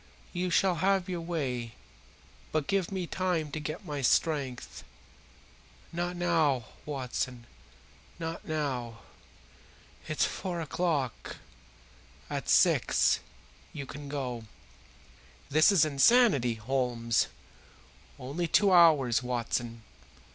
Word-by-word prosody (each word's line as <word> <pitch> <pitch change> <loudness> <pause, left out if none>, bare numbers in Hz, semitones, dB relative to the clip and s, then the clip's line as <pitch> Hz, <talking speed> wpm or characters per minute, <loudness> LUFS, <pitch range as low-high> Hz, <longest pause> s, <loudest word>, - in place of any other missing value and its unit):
You 180 0 -1
shall 180 0 +2
have 190 +1 +2
your 180 -2 -3
way, 130 -9 -3 0.8
but 155 -2 0
give 195 0 0
me 190 -2 -2
time 170 -4 -1
to 155 - -4
get 155 +5 -6
my 145 -4 -4
strength. 135 -1 0 1.1
Not 175 +1 -2
now, 160 -8 +1 0.2
Watson, 130 -3 -3 0.7
not 165 -1 -6
now. 130 -7 -3 1.1
It's - - +1
four 180 -2 -4
o'clock. 155 -5 -2 1.0
At - - -3
six - - +4 0.5
you 140 -2 -6
can 140 +1 -9
go." 125 -5 -4 1.1
"This 155 +7 +6
is 185 -6 +5
insanity, 145 - +4
Holmes." 115 0 0 0.9
"Only 145 +6 -3
two 200 +4 +4
hours, 155 -10 +5
Watson. 120 -2 -3
150 Hz, 100 wpm, -29 LUFS, 125-175 Hz, 1.1 s, This